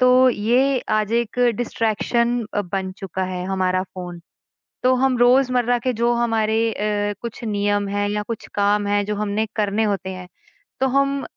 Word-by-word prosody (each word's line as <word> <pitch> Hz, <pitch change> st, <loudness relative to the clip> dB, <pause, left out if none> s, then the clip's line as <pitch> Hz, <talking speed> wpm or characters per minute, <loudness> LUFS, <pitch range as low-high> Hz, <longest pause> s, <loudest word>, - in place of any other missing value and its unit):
तो 255 Hz, +1 st, +6 dB
ये 250 Hz, +5 st, +2 dB
आज 215 Hz, 0 st, +1 dB
एक 235 Hz, 0 st, -1 dB, 0.2 s
डिस्ट्रैक्शन 235 Hz, +1 st, 0 dB
अ, -, -, +1 dB
बन 190 Hz, 0 st, -4 dB
चुका 190 Hz, -2 st, -4 dB
है 180 Hz, -1 st, -4 dB
हमारा 185 Hz, -1 st, 0 dB
फ़ोन 180 Hz, -2 st, -8 dB, 0.6 s
तो 255 Hz, 0 st, +4 dB
हम 260 Hz, 0 st, +2 dB
रोज़मर्रा 245 Hz, -1 st, +3 dB
के 255 Hz, +2 st, -1 dB
जो 235 Hz, +1 st, +1 dB
हमारे 225 Hz, -1 st, +1 dB
अ, 205 Hz, 0 st, -1 dB
कुछ 235 Hz, 0 st, -7 dB
नियम 205 Hz, -1 st, 0 dB
हैं 205 Hz, 0 st, -1 dB
या 210 Hz, 0 st, -1 dB
कुछ 230 Hz, -2 st, -5 dB
काम 205 Hz, 0 st, +2 dB
हैं 205 Hz, 0 st, +1 dB
जो 210 Hz, 0 st, -2 dB
हमने 210 Hz, +1 st, -1 dB
करने 210 Hz, 0 st, +1 dB
होते 195 Hz, -2 st, -1 dB
हैं 185 Hz, -1 st, -9 dB, 0.5 s
तो 265 Hz, -, +3 dB
हम 275 Hz, 0 st, +1 dB
215 Hz, 170 wpm, -21 LUFS, 205-240 Hz, 0.6 s, तो